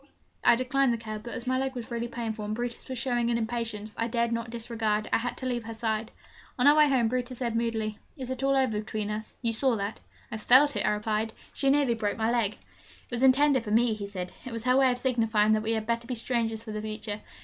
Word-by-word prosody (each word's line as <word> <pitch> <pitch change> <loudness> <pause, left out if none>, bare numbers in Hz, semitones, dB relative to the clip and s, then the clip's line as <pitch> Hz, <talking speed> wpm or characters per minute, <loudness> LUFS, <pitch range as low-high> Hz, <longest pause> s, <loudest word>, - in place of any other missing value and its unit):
I - - +7
declined 255 +1 +2
the 235 - 0
cab; 215 -1 -6
but, 235 +2 -7
as 240 - -5
my 255 0 +1
leg 265 0 -2
was 245 0 -6
really 235 0 -2
painful, 225 -2 -4
and 210 +1 -2
Brutus 240 +2 -5
was 260 - -3
showing 240 -1 0
an 235 - +2
impatience 225 -2 -3
I 230 - +1
dared 235 0 0
not 230 0 -2
disregard, 225 -2 -2
I - - +4
had 245 +1 -3
to 260 - -5
leave 240 -3 -2
her 225 0 -6
side. 220 0 -1 0.5
On 250 - +2
our 290 +1 +8
way 300 -1 +6
home, 250 -4 +3
Brutus 250 +1 -2
said 235 -2 -2
moodily, 225 -2 -1 0.2
'It 260 -2 -5
is 260 0 -4
all 275 0 +3
over 250 -6 +1
between 215 0 -3
us 215 +1 -5
you 230 -1 +1
saw 255 +2 +2
that?' 200 0 -3 0.3
'I 220 - -4
felt 270 +6 +5
it!' - - 0
I - - +5
replied. 215 +1 -1 0.2
'She 275 - +1
nearly 280 -3 +3
broke 210 -3 -2
my 225 +1 +1
leg.' 230 -4 +1
'It - - -24
was 240 0 -2
intended 265 0 +5
for 210 - -6
me,' 230 +2 +3
he 205 -1 -5
said. 185 -3 -6
'It 255 - -7
was 230 -1 -4
her 250 +1 +3
way 265 -1 +5
of 245 - -2
signifying 225 -4 +2
that 215 - +2
we 220 +1 0
had 220 -1 -1
better 235 +1 -1
be 250 - -2
strangers 225 -2 -1
for 220 - -7
the 215 0 -4
future. 215 -1 -5
230 Hz, 260 wpm, -28 LUFS, 220-250 Hz, 0.5 s, our